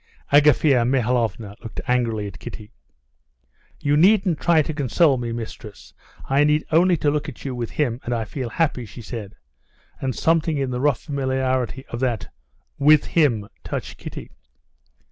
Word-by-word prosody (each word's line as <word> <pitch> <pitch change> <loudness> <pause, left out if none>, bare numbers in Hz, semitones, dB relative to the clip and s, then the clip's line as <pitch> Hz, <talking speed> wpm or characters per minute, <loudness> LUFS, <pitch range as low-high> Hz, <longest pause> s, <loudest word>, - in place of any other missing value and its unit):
Agafea 145 -3 +5
Mihalovna 115 -4 0
looked 115 - -8
angrily 115 -4 0
at 100 - -8
Kitty. 105 0 -9 1.1
"You 145 0 +2
needn't 185 0 +4
try 165 -3 +3
to 160 - -4
console 145 0 +2
me, 120 -1 -3
mistress. 110 -2 -8 0.3
I 140 +2 +3
need 150 +1 +2
only 175 +2 +4
to 145 -1 +1
look 150 0 -2
at 145 - -12
you 135 - -3
with 120 -2 -4
him, 125 -4 -1
and 120 - -4
I 115 -2 -1
feel 125 +2 -5
happy," 140 -4 0
she 115 +3 -11
said, 105 -3 -7 0.6
and 130 -3 -2
something 160 +1 +1
in 135 -2 -1
the 125 0 -2
rough 145 -4 +2
familiarity 130 -2 -1
of 120 - -5
that 120 -5 -2 0.5
with 150 +1 +5
him 120 -11 +2 0.2
touched - - -5
Kitty. - - -8
130 Hz, 160 wpm, -22 LUFS, 115-150 Hz, 1.1 s, Agafea